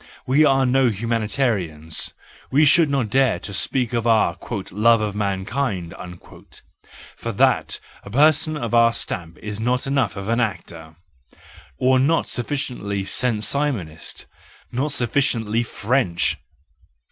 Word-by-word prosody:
We 140 Hz, +4 st, +4 dB
are 135 Hz, -2 st, +3 dB
no 130 Hz, 0 st, +3 dB
humanitarians; 105 Hz, -, -1 dB, 0.3 s
we 145 Hz, +3 st, +4 dB
should 155 Hz, +2 st, +5 dB
not 135 Hz, -7 st, -1 dB
dare 130 Hz, -7 st, +3 dB
to 100 Hz, -, -7 dB
speak 125 Hz, +4 st, 0 dB
of 120 Hz, 0 st, 0 dB
our 110 Hz, -6 st, +3 dB, 0.3 s
" -, -, -14 dB
love 115 Hz, +4 st, +4 dB
of 105 Hz, -1 st, -2 dB
mankind 100 Hz, -1 st, -2 dB, 0.6 s
"; -, -, -19 dB
for -, -, -5 dB
that, -, -, +1 dB, 0.2 s
a -, -, -12 dB
person 155 Hz, +5 st, +3 dB
of 120 Hz, -5 st, -4 dB
our 115 Hz, 0 st, +5 dB
stamp 85 Hz, -6 st, -5 dB
is 105 Hz, -1 st, -5 dB
not 125 Hz, +3 st, 0 dB
enough 135 Hz, -1 st, 0 dB
of 100 Hz, 0 st, -5 dB
an 115 Hz, +1 st, +1 dB
actor! 85 Hz, -7 st, -4 dB, 0.8 s
Or 130 Hz, 0 st, +3 dB
not 155 Hz, +6 st, +2 dB
sufficiently 120 Hz, -7 st, -3 dB
Saint 115 Hz, -1 st, 0 dB
Simonist, 110 Hz, -, -2 dB, 0.5 s
not 140 Hz, +5 st, -1 dB
sufficiently 120 Hz, -4 st, +1 dB
French. 115 Hz, -5 st, 0 dB
115 Hz, 135 wpm, -22 LUFS, 100-135 Hz, 0.8 s, should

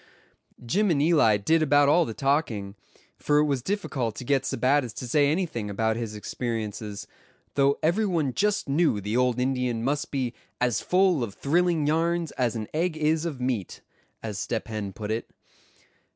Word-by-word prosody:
Jim 200 Hz, -, +1 dB
and 155 Hz, -5 st, +2 dB
Eli 145 Hz, -9 st, +4 dB
did 160 Hz, +11 st, +2 dB
about 145 Hz, -1 st, +4 dB
all 170 Hz, +4 st, +4 dB
the 115 Hz, -, -5 dB
talking, 135 Hz, -9 st, 0 dB, 0.5 s
for 145 Hz, -, +2 dB
it 150 Hz, -, +4 dB
was 140 Hz, -4 st, 0 dB
difficult 135 Hz, -, -2 dB
to -, -, -7 dB
get 135 Hz, +1 st, +2 dB
Sebattis 130 Hz, 0 st, 0 dB
to 125 Hz, -, -6 dB
say 145 Hz, +3 st, +3 dB
anything 155 Hz, -, -2 dB
about 110 Hz, +2 st, 0 dB
his 115 Hz, -2 st, -4 dB
experiences; 105 Hz, -2 st, -4 dB, 0.5 s
though 140 Hz, 0 st, +3 dB
every 190 Hz, +7 st, +2 dB
one 160 Hz, -8 st, 0 dB
just 205 Hz, -, 0 dB
knew 145 Hz, -5 st, +2 dB
the 105 Hz, +3 st, -3 dB
old 125 Hz, -1 st, +2 dB
Indian 125 Hz, -3 st, 0 dB
must 145 Hz, +3 st, -1 dB
be 130 Hz, -4 st, -2 dB, 0.3 s
"as 125 Hz, -3 st, +1 dB
full 180 Hz, -6 st, +2 dB
of 100 Hz, -4 st, -5 dB
thrilling 170 Hz, +1 st, +1 dB
yarns 165 Hz, +1 st, +1 dB
as 120 Hz, -2 st, -1 dB
an 110 Hz, -2 st, -4 dB
egg 160 Hz, +1 st, 0 dB
is 155 Hz, +1 st, +1 dB
of 150 Hz, -6 st, -4 dB
meat," 125 Hz, -7 st, -3 dB, 0.4 s
as 105 Hz, -3 st, -4 dB
Step 115 Hz, +1 st, -3 dB
Hen 105 Hz, -3 st, -4 dB
put 105 Hz, +2 st, -5 dB
it. 110 Hz, +1 st, -3 dB
135 Hz, 175 wpm, -26 LUFS, 115-155 Hz, 0.5 s, Eli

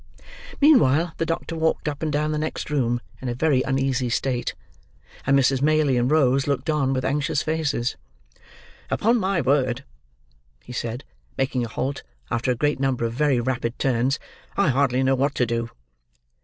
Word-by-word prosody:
Meanwhile, 175 Hz, -, +4 dB
the 165 Hz, -, -1 dB
doctor 165 Hz, 0 st, -3 dB
walked 160 Hz, -1 st, 0 dB
up 145 Hz, -1 st, -3 dB
and 155 Hz, -1 st, -1 dB
down 150 Hz, +1 st, 0 dB
the 150 Hz, -, -1 dB
next 155 Hz, 0 st, -4 dB
room 120 Hz, -4 st, +1 dB, 0.2 s
in 130 Hz, -, -3 dB
a 120 Hz, -, -2 dB
very 140 Hz, -1 st, +2 dB
uneasy 135 Hz, -1 st, 0 dB
state; 125 Hz, +1 st, -1 dB, 0.7 s
and 140 Hz, -, +5 dB
Mrs. 135 Hz, 0 st, +2 dB
Maylie 155 Hz, -2 st, +3 dB
and 120 Hz, +1 st, +1 dB
Rose 135 Hz, -3 st, +3 dB
looked 140 Hz, +2 st, 0 dB
on, 140 Hz, -3 st, +1 dB
with 130 Hz, -1 st, -1 dB
anxious 145 Hz, 0 st, 0 dB
faces. 150 Hz, -6 st, -1 dB, 0.9 s
"Upon 230 Hz, +3 st, +2 dB
my 190 Hz, -3 st, +1 dB
word," 130 Hz, -2 st, +1 dB, 0.8 s
he 125 Hz, -, -10 dB
said, 120 Hz, +2 st, -4 dB, 0.3 s
making 130 Hz, -2 st, 0 dB
a -, -, -3 dB
halt, 135 Hz, +5 st, -3 dB, 0.3 s
after 120 Hz, +2 st, 0 dB
a 125 Hz, -, +2 dB
great 145 Hz, +3 st, 0 dB
number 135 Hz, -3 st, 0 dB
of 115 Hz, -, -2 dB
very 135 Hz, 0 st, +2 dB
rapid 120 Hz, -1 st, -2 dB
turns, 130 Hz, +1 st, +1 dB, 0.4 s
"I 200 Hz, -6 st, +3 dB
hardly 130 Hz, -1 st, +2 dB
know 135 Hz, 0 st, +3 dB
what 140 Hz, +2 st, 0 dB
to 125 Hz, -, +2 dB
do." 115 Hz, 0 st, -2 dB
135 Hz, 170 wpm, -24 LUFS, 125-150 Hz, 0.9 s, and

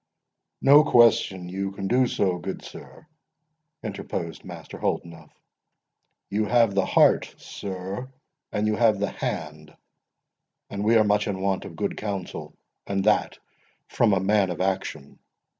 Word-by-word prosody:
"No 145 Hz, +2 st, +8 dB
question 115 Hz, -9 st, +4 dB
you 95 Hz, +2 st, -4 dB
can 95 Hz, -1 st, -4 dB
do 125 Hz, +4 st, +3 dB
so, 95 Hz, -6 st, 0 dB
good 95 Hz, +3 st, -6 dB
sir;" -, -, -12 dB, 0.8 s
interposed 105 Hz, -4 st, -5 dB
Master -, -, -10 dB
Holdenough; 80 Hz, -2 st, -3 dB, 1.0 s
"you 105 Hz, +2 st, +1 dB
have 115 Hz, -2 st, +3 dB
the 95 Hz, -1 st, +1 dB
heart, -, -, +3 dB
sir, 95 Hz, +6 st, -6 dB, 0.4 s
and 105 Hz, +1 st, -1 dB
you 110 Hz, 0 st, +1 dB
have 115 Hz, -3 st, +4 dB
the 100 Hz, -, -2 dB
hand; 75 Hz, 0 st, -5 dB, 0.9 s
and 100 Hz, 0 st, -3 dB
we 110 Hz, +2 st, +3 dB
are 110 Hz, -, +6 dB
much 105 Hz, 0 st, +1 dB
in 100 Hz, -2 st, -3 dB
want 95 Hz, 0 st, -1 dB
of -, -, -9 dB
good -, -, -3 dB
counsel, 100 Hz, -4 st, -5 dB, 0.3 s
and 100 Hz, -1 st, -1 dB
that 105 Hz, +1 st, +2 dB, 0.5 s
from 115 Hz, -4 st, +2 dB
a 95 Hz, -, +3 dB
man 95 Hz, 0 st, +2 dB
of 85 Hz, -, -5 dB
action. 95 Hz, -6 st, -3 dB
100 Hz, 140 wpm, -25 LUFS, 95-110 Hz, 1.0 s, No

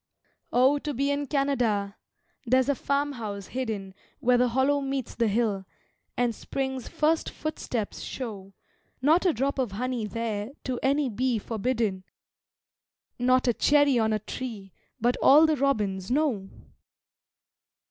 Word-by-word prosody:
Oh, 265 Hz, +4 st, +4 dB
to 295 Hz, -1 st, -4 dB
be 280 Hz, +3 st, +1 dB
in 285 Hz, 0 st, -1 dB
Canada! 240 Hz, -9 st, 0 dB, 0.5 s
there's 255 Hz, +2 st, +3 dB
a -, -, +4 dB
farmhouse 245 Hz, -9 st, -2 dB
hidden 220 Hz, -7 st, -4 dB, 0.3 s
Where 245 Hz, 0 st, +3 dB
the 250 Hz, -, +4 dB
hollow 265 Hz, +4 st, +2 dB
meets 270 Hz, -2 st, -3 dB
the 230 Hz, -1 st, +1 dB
hill 205 Hz, -3 st, 0 dB, 0.5 s
and 245 Hz, -1 st, +1 dB
Spring's 265 Hz, +2 st, -4 dB
first 315 Hz, +1 st, +1 dB
footsteps 245 Hz, -8 st, -4 dB
show 200 Hz, -6 st, -6 dB, 0.5 s
Not 320 Hz, +8 st, +4 dB
a -, -, +5 dB
drop 270 Hz, +4 st, -1 dB
of 245 Hz, -7 st, -1 dB
honey 245 Hz, 0 st, -2 dB
there 225 Hz, +1 st, -3 dB
to 255 Hz, -2 st, -3 dB
any 280 Hz, +1 st, +2 dB
bee 245 Hz, +1 st, 0 dB
forbidden, 220 Hz, -3 st, -1 dB, 1.2 s
Not 255 Hz, +1 st, +3 dB
a 240 Hz, -, +4 dB
cherry 285 Hz, 0 st, +4 dB
on 220 Hz, -1 st, +2 dB
a 215 Hz, -, +2 dB
tree 215 Hz, -3 st, -7 dB, 0.3 s
but 245 Hz, +2 st, +1 dB
all 300 Hz, +4 st, +7 dB
the 315 Hz, -1 st, +2 dB
robins 210 Hz, -9 st, 0 dB
know! 250 Hz, -8 st, 0 dB
250 Hz, 135 wpm, -27 LUFS, 215-275 Hz, 1.2 s, all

